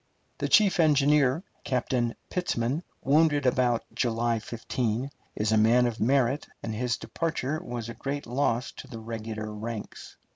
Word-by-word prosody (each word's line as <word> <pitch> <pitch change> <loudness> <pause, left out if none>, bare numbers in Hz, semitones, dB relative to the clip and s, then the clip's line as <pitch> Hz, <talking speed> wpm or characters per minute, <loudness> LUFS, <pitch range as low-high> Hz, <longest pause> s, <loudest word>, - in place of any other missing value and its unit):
The - - -1
chief 200 -4 +5
engineer, 150 -1 +4 0.2
Captain 125 -3 0 0.2
Pitzman, 140 -5 0 0.2
wounded 145 0 +3
about 125 -2 +2
July 115 -1 +1
15th, 115 +3 -2 0.2
is 105 +1 0
a 110 - +4
man 120 +3 +5
of 120 -2 -2
merit, 130 +3 +2 0.2
and 110 - -3
his 120 +2 -1
departure 155 -2 -2
was 120 -2 -5
a 115 - -5
great 140 +3 -4
loss 120 0 0
to - - -9
the 125 -4 -8
regular 110 -1 -5
ranks. 110 0 -7
125 Hz, 145 wpm, -28 LUFS, 115-140 Hz, 0.2 s, chief